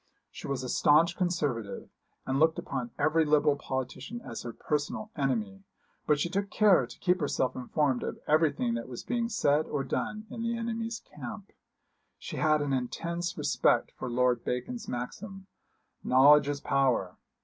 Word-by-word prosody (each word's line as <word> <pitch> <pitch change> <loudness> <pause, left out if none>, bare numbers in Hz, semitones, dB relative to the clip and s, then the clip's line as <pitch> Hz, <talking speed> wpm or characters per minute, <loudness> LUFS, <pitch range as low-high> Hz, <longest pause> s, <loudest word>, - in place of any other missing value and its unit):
She - - -8
was 135 -2 -2
a - - -4
staunch 155 +7 +4
Conservative, 145 - -2 0.4
and 135 +1 0
looked 160 +1 +4
upon 130 -3 -4
every 155 +2 +3
Liberal 150 -1 +3
politician 130 - -5
as - - -7
her 120 - -6
personal 150 - -3
enemy; 110 -9 -2 0.4
but 150 -1 +3
she 160 - +1
took 200 +3 -2
care 195 - +4
to - - -12
keep 180 0 +1
herself 140 -3 0
informed 130 +1 0
of - - -4
everything 150 -6 +2
that 115 +1 -4
was 120 - -7
being 235 -1 -1
said 155 -9 +2
or 145 -2 -2
done 215 +10 -3
in 230 - -6
the 230 0 -1
enemy's 230 0 -3
camp. 150 +9 -9 0.7
She - - -7
had 155 -1 +3
an 140 -1 -1
intense 170 +7 -3
respect - - +2
for 130 - -6
Lord 125 0 +1
Bacon's 125 - -4
maxim: 190 - -6 0.6
Knowledge 140 +3 +6
is 145 -1 -2
power. 130 -9 +1
145 Hz, 160 wpm, -29 LUFS, 130-175 Hz, 0.7 s, Knowledge